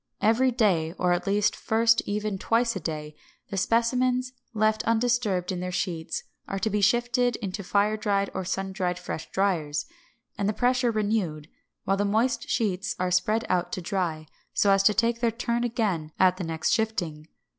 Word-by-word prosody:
Every 225 +5 +3
day, 190 -10 +1
or 180 -1 +1
at 175 0 -2 0.3
first 225 +1 +2
even 205 -1 -2
twice 230 +2 +1
a - - -2
day, 150 -2 -5 0.4
the - - -3
specimens, 250 +4 +1 0.2
left 215 -1 +1
undisturbed 225 -6 +1
in 180 - -3
their 180 0 -3
sheets, 170 -2 -3 0.2
are 195 - -3
to 210 +3 -1
be 210 0 0
shifted 240 +3 +2
into 200 -1 -5
fire 205 +3 +1
dried 200 -2 0
or 190 - -3
sun 190 +1 -3
dried 180 -2 -1
fresh 180 -3 -6
driers, 155 -7 0 0.5
and 200 0 +1
the - - 0
pressure 250 +2 +2
renewed, 205 -9 -1 0.3
while 195 +1 +1
the 205 - +1
moist 230 +4 0
sheets 195 -4 0
are 180 0 -1
spread 215 +5 +2
out 180 -1 0
to - - -2
dry, 170 -5 -2 0.3
so 200 - +4
as 195 0 +5
to 210 +1 +4
take 230 +2 +2
their 235 - +3
turn 235 +1 -1
again 205 -10 -1
at 185 -1 +4
the 185 - -4
next 165 -1 -1
shifting. 175 -9 -1
205 Hz, 175 wpm, -26 LUFS, 180-230 Hz, 0.5 s, as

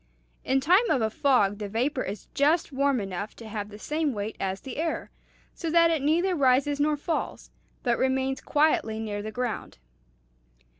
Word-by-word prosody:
In 265 +1 +2
time 370 - +4
of 250 - +2
a 220 - 0
fog 210 -7 +2
the 205 -1 -4
vapor 255 +6 0
is 200 -2 -5
just 305 +4 +2
warm 275 -1 +1
enough 195 +1 -5
to 230 - -10
have 210 -1 -5
the 210 - -10
same 300 +5 -1
weight 210 0 -4
as 190 0 -2
the 265 - -7
air, 325 +1 -2 0.4
so 335 - -4
that 335 0 +5
it 320 -4 0
neither 340 +6 +2
rises 280 -1 +2
nor 300 +1 +2
falls, 320 +3 -3 0.3
but 240 -2 +1
remains 265 0 0
quietly 290 -7 +1
near 210 -2 -3
the 215 - -5
ground." 240 - -4
265 Hz, 180 wpm, -27 LUFS, 215-300 Hz, 0.4 s, that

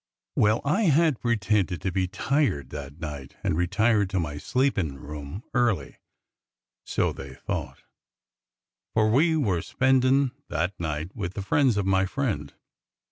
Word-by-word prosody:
Well, 105 +2 +3
I 195 +10 +2
had 155 -4 +3
pretended 105 -6 +1
to 95 - 0
be 95 0 0
tired 125 - 0
that 70 +1 -7
night 75 -4 -7
and - - +1
had 80 - -1
retired 100 +3 +2
to 95 -1 0
my 75 -3 -3
sleepin' 100 - 0
room 75 - -7
early, 120 -5 +1 0.9
so - - 0
they 65 -1 -9
thought, - - -5 1.1
for 110 -1 +4
we 160 +8 +4
werespendin' 130 - +2 0.2
that 85 +4 -1
night 80 +1 -3
^s^ith 95 -5 -4
the 100 - -4
friends 125 +2 +3
of 100 - 0
my 95 0 +2
friend. 130 +1 -2
100 Hz, 140 wpm, -26 LUFS, 85-125 Hz, 1.1 s, for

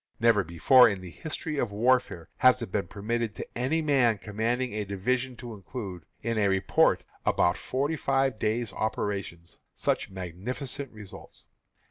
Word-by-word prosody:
Never 115 -3 +4
before, 105 +10 +6
in 100 -3 -4
the 90 -2 -9
history 155 - -5
of 120 - -1
warfare, 115 -5 +1
has 130 0 +5
it 110 - -7
been 100 -4 -1
permitted 110 +3 -2
to - - -5
any 140 +7 0
man 130 -7 +3
commanding 110 +5 -2
a 105 0 -2
division 125 +6 -1
to 120 -1 -8
include, 95 - -7 0.2
in 115 0 0
a 100 - +3
report 95 0 +3 0.2
of - - +1
about 85 - +3
forty 140 +5 -1
five 135 -5 +1
days' 110 +1 -1
operations, 100 -6 -3 0.2
such - - -1
magnificent 110 - -5
results. 105 -3 -12
110 Hz, 155 wpm, -28 LUFS, 100-130 Hz, 0.2 s, before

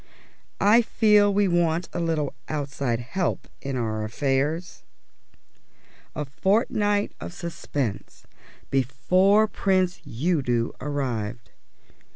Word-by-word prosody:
"I 210 +4 +6
feel 210 -3 +4
we 200 0 +2
want 175 -1 +1
a - - -2
little 160 -4 -1 0.2
outside 140 -5 -2
help 175 +8 -2
in 135 -2 -3
our 110 -2 -2
affairs." 140 +9 -1 1.3
A 150 - -2
fortnight 205 - +1
of - - -6
suspense 140 - -4 0.5
before 180 - +3
Prince 185 -3 0
Udo 125 -4 0
arrived. 125 -6 -3
155 Hz, 95 wpm, -25 LUFS, 130-190 Hz, 1.3 s, I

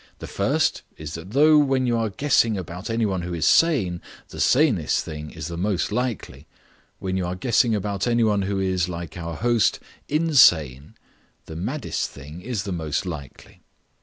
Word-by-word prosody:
The - - -8
first - - 0 0.2
is 75 0 -7
that 85 +2 -8
though 150 +6 +5
when 135 -3 +2
you 120 -1 +1
are 115 -1 0
guessing 115 -2 +2
about 90 +2 -7
any 115 0 0
one 95 -3 -1
who 90 0 -4
is 80 - -1
sane, 105 - +3 0.3
the - - -10
sanest 125 - +2
thing 75 -1 -7
is 80 -2 -8
the 85 0 -6
most 100 -1 -1
likely; 125 -2 -4 0.5
when 95 0 -3
you 90 - -1
are 90 - -3
guessing 115 +3 +2
about 100 +1 -2
any 120 -1 +2
one 105 -2 +2
who 95 0 -2
is, 95 -2 0
like 85 -2 -6
our 85 -1 -5
host, 115 0 +1 0.3
insane, 90 - +3 0.5
the 80 - -9
maddest 125 - -3
thing 75 +5 -11
is 115 -2 -3
the 100 - -5
most 80 -1 -2
likely. 75 -6 -9
95 Hz, 180 wpm, -23 LUFS, 85-120 Hz, 0.5 s, though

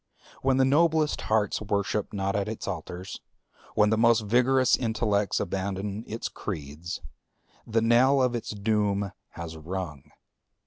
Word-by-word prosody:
When 130 -1 +2
the 135 - +5
noblest 155 +2 +3
hearts 110 -2 +1
worship 100 0 -1
not 100 -1 -1
at 100 0 0
its 110 - -5
altars, 90 0 -6 0.5
when 105 0 +4
the 110 - +2
most 115 -1 +5
vigorous 125 +4 +3
intellects 105 -4 0
abandon 100 +2 -3
its 115 +2 -4
creeds, 80 -1 -6 0.7
the 115 0 +1
knell 125 +4 +5
of 125 -2 +2
its 120 - -4
doom 100 -2 0 0.2
has 85 -1 -7
rung. 80 -3 -6
105 Hz, 135 wpm, -27 LUFS, 95-120 Hz, 0.7 s, the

